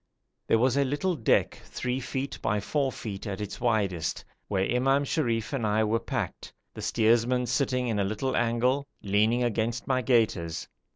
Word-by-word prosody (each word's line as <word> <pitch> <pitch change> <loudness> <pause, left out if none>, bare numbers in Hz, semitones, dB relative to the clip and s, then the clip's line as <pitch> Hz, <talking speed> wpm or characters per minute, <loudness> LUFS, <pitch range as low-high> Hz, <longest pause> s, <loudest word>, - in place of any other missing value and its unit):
There - - +4
was 130 +3 +2
a 140 - +4
little 145 +7 0
deck 115 -7 +1
3 125 +1 -3
feet 135 +2 -4
by 105 - +1
4 140 +4 0
feet 105 -3 -6
at 95 -2 -4
its 105 +1 -6
widest, 105 -8 0 0.2
where 95 -2 +1
Imam 135 +5 +2
Sharif 120 -6 -1
and 135 -4 -1
I 110 +1 +2
were 110 +2 +1
packed, 120 -9 -4 0.2
the - - -8
steersman 120 +2 +2
sitting 130 -1 0
in 110 -3 0
a - - +2
little 110 +7 -1
angle, 125 +4 +1 0.2
leaning 110 +5 +2
against 115 0 -1
my 130 -1 +1
gaiters. 110 -9 +1
120 Hz, 170 wpm, -28 LUFS, 110-130 Hz, 0.2 s, There